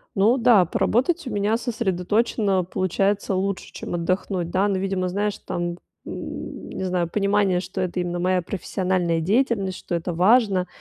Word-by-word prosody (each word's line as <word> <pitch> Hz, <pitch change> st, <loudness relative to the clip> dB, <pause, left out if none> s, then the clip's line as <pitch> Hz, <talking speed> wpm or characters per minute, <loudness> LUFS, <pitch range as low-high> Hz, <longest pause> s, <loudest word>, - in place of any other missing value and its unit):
Ну 220 Hz, +7 st, +4 dB
да, 230 Hz, -7 st, +5 dB
поработать 265 Hz, -, +1 dB
у -, -, -2 dB
меня 205 Hz, +2 st, +1 dB
сосредоточено 215 Hz, -2 st, 0 dB
получается 195 Hz, +3 st, 0 dB
лучше, 195 Hz, 0 st, -2 dB
чем -, -, -7 dB
отдохнуть. 180 Hz, 0 st, -1 dB
Да, 190 Hz, +3 st, +2 dB
но, 195 Hz, -2 st, 0 dB
видимо, 185 Hz, -1 st, -1 dB
знаешь, 205 Hz, +2 st, -1 dB
там, 175 Hz, 0 st, -3 dB, 0.3 s
н -, -, -7 dB
не -, -, -5 dB
знаю, 180 Hz, -2 st, 0 dB
понимание, 200 Hz, -2 st, +2 dB
что 190 Hz, +1 st, -4 dB
это 180 Hz, 0 st, -2 dB
именно 175 Hz, 0 st, -2 dB
моя 185 Hz, +1 st, +2 dB
профессиональная 180 Hz, -2 st, -1 dB
деятельность, 200 Hz, 0 st, +1 dB
что -, -, -7 dB
это 170 Hz, +1 st, -2 dB
важно. 195 Hz, 0 st, +3 dB
190 Hz, 155 wpm, -23 LUFS, 180-205 Hz, 0.3 s, да